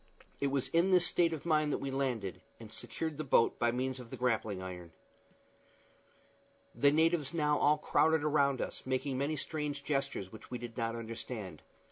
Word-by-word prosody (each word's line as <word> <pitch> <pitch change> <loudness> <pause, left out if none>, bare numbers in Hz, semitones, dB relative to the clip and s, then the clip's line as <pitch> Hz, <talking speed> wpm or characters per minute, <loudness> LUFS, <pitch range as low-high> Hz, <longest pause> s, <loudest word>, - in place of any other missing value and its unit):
It 140 - +1
was 135 -1 -1
in 170 +3 +3
this 180 -2 +5
state 170 -2 +2
of 160 -1 -5
mind 155 -2 +2
that - - +1
we 135 - -4
landed, 125 -8 -2 0.2
and - - -11
secured 160 -3 -4
the 155 - -2
boat 130 -4 +3
by 120 0 +3
means 130 +1 -2
of 120 -2 -10
the 130 - -7
grappling 110 -5 0
iron. 90 -3 -8 1.8
The 140 - +4
natives 160 0 +2
now 150 -2 +2
all 150 +1 +4
crowded 160 0 +3
around 140 -3 +2
us, - - -4
making 130 0 -1
many 145 +3 0
strange 150 -1 -3
gestures, 135 -10 -2
which 110 - -12
we 125 - -3
did 120 -1 -8
not 115 -1 -1
understand. 110 - -6
135 Hz, 180 wpm, -33 LUFS, 115-150 Hz, 1.8 s, this